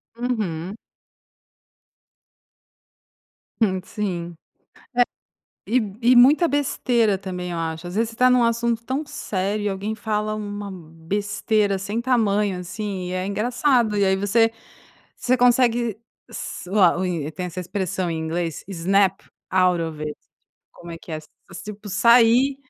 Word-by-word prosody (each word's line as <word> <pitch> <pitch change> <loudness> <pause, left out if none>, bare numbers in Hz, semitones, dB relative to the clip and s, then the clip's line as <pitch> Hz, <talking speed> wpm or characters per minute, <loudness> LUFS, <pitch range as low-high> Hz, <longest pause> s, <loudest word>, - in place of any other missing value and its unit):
Uhum. 210 -7 -3 2.8
Hum, 190 -4 +2
sim. 175 -5 -4 1.3
É, - - -9
e 225 -5 +1
e 245 +2 +5
muita 285 +8 +6
besteira 245 -7 +1
também 180 -2 -5
eu 170 - -3
acho, 160 +1 -4
às 175 - -7
vezes, 225 +1 +1
você 225 - -12
está 250 +2 +4
num 250 -1 +4
assunto 235 0 0
tão 265 +5 -2
sério 205 -5 -3
e - - +1
alguém 200 +2 -3
fala 215 -1 -2
uma 205 -1 -5
besteira 200 +5 -1
sem 200 +4 -3
tamanho, 210 -6 +1
assim, 185 0 -5
e - - -5
é 185 0 -2
engraçado 240 +2 +1
e 200 - +2
aí 190 0 +3
você 225 +4 +2 0.6
você 255 +1 +1
consegue 240 -3 +3 0.3
s - - -7
o 210 - +2
a 185 0 +4
e 160 -4 -2
tem 160 +4 -5
essa 180 +1 -5
expressão 180 -1 -2
em 165 - -2
inglês, 165 -1 -3
snap 195 +1 +1 0.3
out 180 -2 +3
of 160 -2 -5
it, 150 -1 -4 0.6
como 170 - -12
é 165 - -6
que 165 - -10
é - - -1
s 155 -1 -11 0.4
tipo 210 0 -9
sair 235 +6 +5
205 Hz, 145 wpm, -23 LUFS, 180-230 Hz, 2.8 s, muita